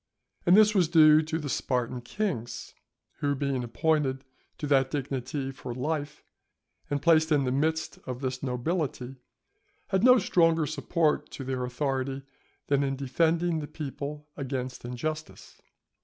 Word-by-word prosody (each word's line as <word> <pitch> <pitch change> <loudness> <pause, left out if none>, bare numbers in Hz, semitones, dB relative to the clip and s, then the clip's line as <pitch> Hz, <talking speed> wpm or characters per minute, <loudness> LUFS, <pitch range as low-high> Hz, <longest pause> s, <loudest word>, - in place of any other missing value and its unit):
And 180 +3 +7
this 215 0 +6
was 185 -5 +3
due 155 -2 +7
to 160 +1 -3
the 150 -3 -5
Spartan 125 -2 -1
kings, 120 - -4 0.5
who, 145 -1 0
being 135 -2 -1
appointed 135 +1 0 0.3
to - - -4
that 135 -2 +3
dignity 135 -1 -3
for 130 -3 -7
life, 145 +2 -3 0.7
and 145 0 -2
placed 160 -1 +4
in 145 -2 +4
the 125 - 0
midst 160 +4 -1
of 125 -1 -4
this 130 -1 -3
nobility, 135 0 -2 0.7
had 190 0 +1
no 250 +1 +8
stronger 165 -6 +3
support 155 +1 0
to 135 - -6
their 130 -1 -2
authority 135 +1 -2 0.4
than 140 -1 +2
in 135 -1 0
defending 165 +5 +1
the 150 - -5
people 150 0 -6
against 130 -2 -4
injustice. 155 +6 -6
145 Hz, 140 wpm, -28 LUFS, 130-160 Hz, 0.7 s, no